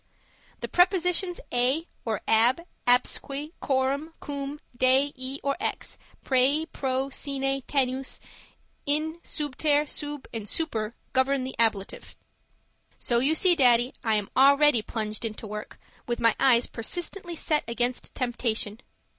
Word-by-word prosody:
The - - -3
prepositions 360 0 +2
a 260 +7 +2 0.2
or 220 -4 -2
ab, 240 +9 +4 0.2
absque, 275 +4 +2
coram, 275 +4 -1
cum, 280 0 -5 0.2
de 260 +3 +3
e 260 +1 -5
or 280 0 0
ex, - - -3 0.3
prae, 275 +4 +3
pro, 265 -3 -2
sine, 270 -1 -2
tenus, 265 -1 -1 0.7
in, 310 +3 0
subter, 295 -1 0
sub 295 -2 -5
and 215 -3 -5
super 230 -9 -2 0.2
govern 260 0 +2
the 260 - -5
ablative. 220 -4 -1 0.8
So 235 -1 +1
you 280 +6 +2
see, 360 +2 +5
Daddy, 245 -4 +4
I 220 -2 +2
am 205 -2 -2
already 280 -1 +6
plunged 215 0 -4
into 220 -1 -4
work 210 0 -7 0.3
with 240 -1 -2
my 230 -1 +4
eyes 245 -3 +5
persistently 345 - -4
set 305 -1 0
against 240 +1 -2
temptation. 230 -4 -1
265 Hz, 130 wpm, -26 LUFS, 240-295 Hz, 0.8 s, already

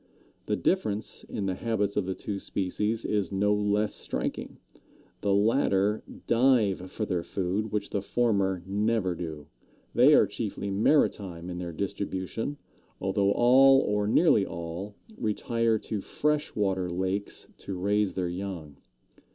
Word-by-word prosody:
The - - +1
difference 110 - -1
in 100 - -4
the 95 - 0
habits 105 0 -1
of 105 -3 0
the 95 - -2
two 100 -2 -4
species 105 +5 -2
is 105 -2 0
no 100 +1 +2
less 105 0 +1
striking. - - -4 0.6
The 100 - +1
latter 105 -1 +2 0.2
dive 115 -7 +3
for 110 +3 -3
their 90 -4 -1
food, 95 +4 -2
which 105 -1 -2
the 100 - -1
former 100 -5 +1
never 100 -1 0
do; 80 -4 -6 0.5
they - - +6
are - - +6
chiefly 100 - -4
maritime 95 - +1
in 90 - -5
their 85 -1 -4
distribution, 100 - -3 0.4
although 100 +1 +1
all, 135 +3 +6
or 105 -3 0
nearly 115 - +4
all, 85 +4 -6 0.2
retire 115 +1 +1
to 105 -1 -4
fresh 150 +7 -1
water 95 -3 0
lakes 95 +3 -3
to 95 - -6
raise 100 +2 +1
their 90 -2 -1
young. 85 -5 -6
100 Hz, 140 wpm, -28 LUFS, 95-110 Hz, 0.6 s, they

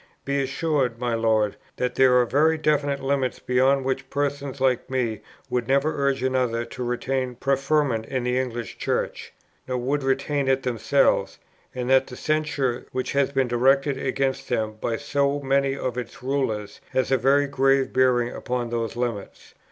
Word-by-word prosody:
Be 140 0 0
assured, 135 -3 0
my 120 0 -1
Lord, 110 -2 +1 0.2
that 125 -1 -1
there 130 0 +5
are 125 - +3
very 155 +6 +3
definite 145 -2 +1
limits, 135 -2 0
beyond 130 +2 +2
which 130 0 -2
persons 140 -1 -2
like 130 -2 +1
me 120 -5 -1 0.3
would 125 -2 -2
never 140 +3 +2
urge 135 -2 0
another 125 -3 0
to 125 +2 -6
retain 125 +1 -2
preferment 135 -3 0
in 130 -2 -2
the 125 +1 +1
English 120 -5 -4
Church, - - -2 0.4
nor 130 -1 -1
would 135 +4 -1
retain 135 +1 0
it 135 0 +2
themselves; 120 -4 +1 0.4
and 125 -1 -3
that 135 0 +5
the 125 - -9
censure 150 -5 -1
which 130 0 -2
has 140 -1 +1
been 135 -2 +1
directed 135 +3 +2
against 135 0 -1
them 110 -3 -1
by 115 -1 -1
so 140 +2 0
many 135 0 +1
of 125 -2 -3
its 125 +1 -9
Rulers 125 -6 -2
has 130 0 +1
a 135 - +5
very 140 +4 +3
grave 135 -1 +2
bearing 125 -2 +3
upon 125 -2 -3
those 115 -1 -2
limits." 120 -4 -5
130 Hz, 165 wpm, -24 LUFS, 125-140 Hz, 0.4 s, there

